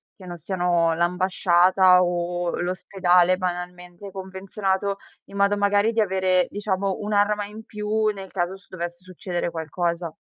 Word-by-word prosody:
che 185 - -13
non 175 -1 -7
siano 175 -1 +1
l'ambasciata 180 +1 +4
o 175 0 -2
l'ospedale 180 0 +2
banalmente 180 +1 -6
convenzionato, 190 +1 -3 0.3
in - - -14
modo 200 +1 +3
magari 205 +2 +2
di 230 - -1
avere 185 -3 +2
diciamo 200 -2 -2
un'arma 210 0 +1
in 215 +2 -11
più 210 0 -2
nel 195 -1 -9
caso 180 0 -2
ci 195 - -19
dovesse 175 -1 -6
succedere 180 -1 -4
qualcosa. 170 +1 -3
185 Hz, 135 wpm, -24 LUFS, 175-200 Hz, 0.3 s, l'ambasciata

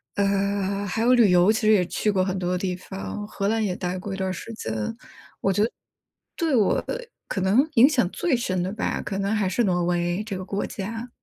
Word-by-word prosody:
呃， 200 0 0
还 210 +3 -2
有 250 +1 +5
旅 225 -6 +5
游 180 +3 +5
其 220 - 0
实 215 -1 +4
也 195 -4 +4
去 210 - 0
过 190 -2 +2
很 190 0 -1
多 180 -1 -1
的 180 - +1
地 185 -1 -1
方， 195 +3 -6
荷 200 -1 -2
兰 220 +1 +1
也 185 -3 -1
待 180 0 -3
过 195 +2 -5
一 - - -4
段 190 -1 -1
儿 - - -2
时 225 +5 -7
间。 110 - -5 0.7
我 195 - +2
觉 205 - +2
得 230 - 0 0.6
对 325 -5 +1
我 215 -5 +2 0.4
可 - - -2
能 220 +11 +3
影 240 +2 +8
响 250 - +2
最 325 -7 +1
深 185 -6 -1
的 185 +2 -2
吧， 220 - -2
可 195 - -4
能 200 +1 0
还 205 -2 +1
是 235 +6 +1
挪 180 -3 +1
威 175 +2 0
这 205 -3 -5
个 185 - -6
国 200 +1 -2
家。 225 +4 -5
200 Hz, 255 characters per minute, -24 LUFS, 185-220 Hz, 0.7 s, 影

